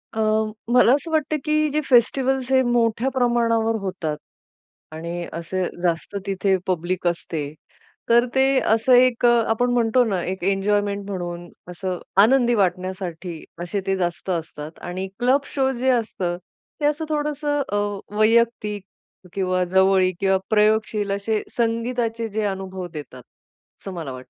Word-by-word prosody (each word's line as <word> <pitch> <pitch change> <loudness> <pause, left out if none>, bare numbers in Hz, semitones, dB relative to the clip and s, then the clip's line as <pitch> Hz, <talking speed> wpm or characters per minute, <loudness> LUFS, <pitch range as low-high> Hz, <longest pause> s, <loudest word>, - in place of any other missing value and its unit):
अ, - - -2 0.5
मला 250 -1 +6
असं 320 +3 -1
वाटतं 310 -1 +1
की 305 - 0 0.2
जे 300 - +1
फेस्टिव्हल्स 260 +1 +2
हे 260 0 +5
मोठ्या 240 +1 +1
प्रमाणावर 230 -3 +2
होतात 180 -6 -3 0.7
आणि 170 +2 -5
असे 170 +3 -3 0.2
जास्त 170 +3 -1
तिथे 195 0 +1
पब्लिक 180 0 -1
असते, 160 -4 -3 0.6
तर 240 +1 +5
ते 265 0 +5 0.3
असं 225 +3 +3
एक 245 -1 +4
अ, - - +7 0.2
आपण 245 +2 +1
म्हणतो 240 +1 +3
ना, 195 -5 -1
एक 190 -1 -4
एन्जॉयमेंट 200 +1 0
म्हणून, 175 -2 -5 0.2
असं 180 +1 -4 0.2
आनंदी 240 +2 +4
वाटण्यासाठी, 185 -3 -2 0.2
असे 185 +3 -3
ते 195 - +2
जास्त 175 +1 -3
असतात. 160 -3 -4
आणि 185 +2 -4
क्लब 260 +3 +3
शो 265 -1 +1
जे 260 +1 +1
असतं, 195 -7 -1 0.4
ते - - +1
असं 300 +2 0
थोडंसं 295 -1 -1
अ, - - 0 0.4
वैयक्तिक 215 -2 +2 0.5
किंवा 185 -2 0
जवळीक 190 0 +3
किंवा 195 -1 +3
प्रयोगशील 215 -1 +2
असे, 205 +2 -1 0.2
संगीताचे 230 0 -1
जे 215 0 -3
अनुभव 190 -2 -4
देतात, 145 -5 -9 0.6
असं 195 - -7
मला 165 -6 -5
वाटतं. 130 0 -10
205 Hz, 140 wpm, -22 LUFS, 185-240 Hz, 0.7 s, अ